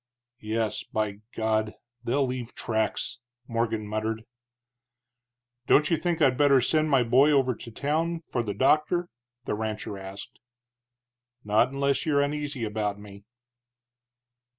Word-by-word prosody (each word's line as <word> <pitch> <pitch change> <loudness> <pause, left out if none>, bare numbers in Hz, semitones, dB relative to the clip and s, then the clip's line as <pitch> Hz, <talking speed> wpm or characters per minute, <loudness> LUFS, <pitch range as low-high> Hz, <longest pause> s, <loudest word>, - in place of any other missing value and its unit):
"Yes, 110 0 -2
by 105 -2 -2
God! 110 -1 0 0.3
they'll 135 +4 +1
leave 125 -2 -5
tracks!" 110 +3 -2 0.3
Morgan 115 -2 -1
muttered. 110 +1 -3 1.4
"Don't 150 +4 +4
you - - +5
think 170 +1 -1
I'd 130 -3 +3
better 140 -2 +6
send 155 +5 +2
my 135 -4 +4
boy 130 +5 +5
over 135 -3 +3
to 115 - -10
town 160 +7 -1
for 130 -6 -2
the 105 -4 -4
doctor?" 155 - +2 0.4
the - - -1
rancher 105 -2 -4
asked. 95 +1 -9 1.0
"Not 105 +4 +3
unless 140 +1 0
you're 145 -2 +3
uneasy 145 -3 -2
about 105 -2 -2
me." 100 0 -13
120 Hz, 130 wpm, -27 LUFS, 110-145 Hz, 1.4 s, better